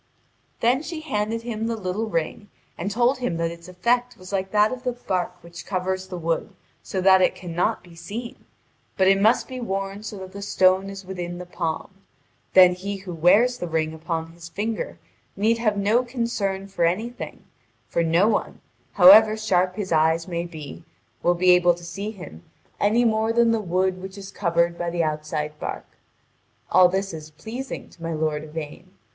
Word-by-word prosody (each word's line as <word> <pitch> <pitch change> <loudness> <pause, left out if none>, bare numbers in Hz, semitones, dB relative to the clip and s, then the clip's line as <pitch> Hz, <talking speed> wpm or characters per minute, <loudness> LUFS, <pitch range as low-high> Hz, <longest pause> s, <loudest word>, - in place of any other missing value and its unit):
Then 250 +4 +3
she 315 0 -6
handed 225 -5 -2
him 225 -2 -3
the 230 - -1
little 210 +2 -3
ring 200 +4 -3 0.3
and 180 +4 -3
told 245 +5 +2
him 245 -10 -2
that 165 0 -1
its 170 +1 -11
effect 240 +7 0
was 185 +1 -11
like 190 -1 -1
that 210 +1 +3
of 255 -1 -5
the 250 -1 -2
bark 185 -7 -2
which 170 +1 -10
covers 190 0 -2
the 185 -1 -6
wood 165 -1 -2 0.3
so 190 - -3
that 190 0 +6
it 180 - +3
cannot 175 -1 -2
be 175 -1 -16
seen; 205 +9 -8 0.5
but 190 -1 +4
it 195 0 +4
must 220 +3 +3
be 255 -1 -6
worn 195 -3 -3
so 215 -1 -7
that 190 -1 -8
the 200 - -8
stone 190 -1 +3
is 195 -1 -8
within 175 -2 -5
the 180 - -7
palm; 170 +1 -4 0.6
then 180 -1 +8
he 200 +3 -5
who 190 -2 -8
wears 210 +10 +4
the 175 - -3
ring 160 -1 -1
upon 165 0 -4
his 170 0 -11
finger 215 +5 -3 0.4
need 225 +3 +2
have 215 -3 +1
no 215 +5 +3
concern 230 -6 -2
for 195 -3 -2
anything; 185 0 -2 0.4
for 170 - 0
no 170 +5 +3
one, 220 - -1 0.3
however 215 +3 +8
sharp 185 -4 +1
his 195 -3 -4
eyes 160 +1 +2
may 170 -1 -3
be, 160 -1 -9 0.4
will 175 - +3
be 180 +1 +4
able 175 -1 +5
to 175 - -14
see 200 +4 -5
him 130 - -10 0.4
any 225 +4 +3
more 220 0 +2
than 235 0 +4
the 225 -1 +1
wood 185 0 0
which 190 +1 -8
is 195 0 -9
covered 170 -2 0
by 175 - -1
the 170 0 0
outside 150 -1 -3
bark. - - -5 0.9
All 180 -1 +7
this 195 0 -2
is 155 -1 -8
pleasing 230 - -7
to 170 - -20
my 165 0 -3
lord 155 -1 -1
Yvain. 160 +4 -8
190 Hz, 190 wpm, -24 LUFS, 170-215 Hz, 0.9 s, then